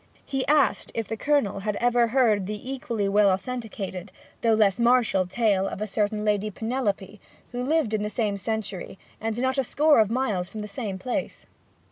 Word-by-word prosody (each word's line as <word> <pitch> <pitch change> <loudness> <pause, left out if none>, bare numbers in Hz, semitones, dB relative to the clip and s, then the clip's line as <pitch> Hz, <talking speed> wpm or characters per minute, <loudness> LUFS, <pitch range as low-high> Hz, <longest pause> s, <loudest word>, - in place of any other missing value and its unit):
He 270 -1 -2
asked 290 -1 +2
if 225 -3 -2
the 225 - -3
Colonel 250 -6 +1
had 210 +1 -2
ever 240 0 +3
heard 225 -6 +2
the 210 +5 -5
equally 240 -7 -2
well 205 0 +4
authenticated, 195 -3 -4 0.3
though 225 -1 +4
less 205 -3 +3
martial 235 -6 +3
tale 195 -1 +1
of - - -5
a 215 - -1
certain 210 +1 -1
Lady 210 0 +1
Penelope, 210 -3 -3 0.3
who 245 0 -3
lived 290 -5 +1
in 215 - +1
the 210 - -2
same 210 -1 -1
century, 200 -2 -4 0.2
and 225 +1 -2
not 260 +2 +1
a - - +2
score 295 +2 +4
of 215 -2 +4
miles 215 -7 -1
from 215 +2 -6
the 210 - -5
same 200 -2 -4
place? 245 +6 -4
215 Hz, 185 wpm, -25 LUFS, 200-245 Hz, 0.3 s, well